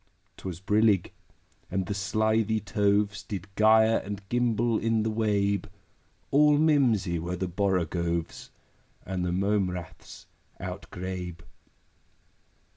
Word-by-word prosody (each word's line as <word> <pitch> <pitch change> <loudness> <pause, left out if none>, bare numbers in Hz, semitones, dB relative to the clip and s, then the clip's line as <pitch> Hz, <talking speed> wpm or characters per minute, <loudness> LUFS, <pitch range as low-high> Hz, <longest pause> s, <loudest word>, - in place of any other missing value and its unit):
'Twas 90 -3 -6
brillig, 105 0 +2 0.6
and 95 0 -1
the 100 - -3
slithy 110 +2 +1
toves 100 0 +1
Did 100 -3 -6
gyre 110 +1 +5
and 100 0 -7
gimble 120 -2 +1
in 115 -1 +1
the 110 - -1
wabe: 100 -2 0 0.6
All 150 +1 +5
mimsy 125 - +2
were 85 +2 -3
the 95 +1 -3
borogoves, 85 -3 -1 0.6
And 95 -1 -3
the 90 - -1
mome 100 +1 +1
raths 90 -2 -9 0.3
outgrabe. 90 -1 -6
100 Hz, 110 wpm, -27 LUFS, 90-110 Hz, 0.6 s, gyre